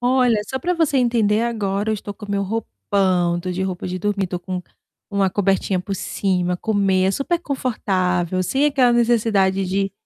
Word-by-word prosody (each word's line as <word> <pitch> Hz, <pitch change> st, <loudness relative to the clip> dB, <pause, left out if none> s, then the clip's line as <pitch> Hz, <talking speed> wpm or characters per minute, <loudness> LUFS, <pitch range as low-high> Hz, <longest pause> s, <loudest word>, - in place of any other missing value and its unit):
Olha, 245 Hz, -3 st, +3 dB
só 265 Hz, -, -2 dB
pra 355 Hz, +7 st, -1 dB
você 325 Hz, -4 st, +1 dB
entender 230 Hz, -4 st, +2 dB
agora 210 Hz, -3 st, -1 dB
eu -, -, +1 dB
estou 205 Hz, 0 st, -6 dB
com 205 Hz, 0 st, -9 dB
meu 200 Hz, 0 st, 0 dB
roupão, 185 Hz, -, 0 dB
tô 185 Hz, +1 st, -4 dB
de 185 Hz, +1 st, -2 dB
roupa 185 Hz, -1 st, -3 dB
de 180 Hz, 0 st, -3 dB
dormir, 200 Hz, 0 st, -1 dB
tô 180 Hz, 0 st, -4 dB
com 180 Hz, +1 st, -4 dB, 0.5 s
uma 200 Hz, -1 st, +2 dB
cobertinha 195 Hz, -1 st, +1 dB
por 195 Hz, +2 st, -4 dB
cima, 180 Hz, -2 st, -1 dB
comer 195 Hz, -2 st, +1 dB
é -, -, +3 dB
super 280 Hz, -, -1 dB
confortável, 185 Hz, -, -1 dB
sem 270 Hz, +9 st, +1 dB
aquela 265 Hz, -4 st, +3 dB
necessidade 215 Hz, -5 st, +2 dB
de 195 Hz, +1 st, -1 dB
200 Hz, 180 wpm, -21 LUFS, 185-235 Hz, 0.5 s, Olha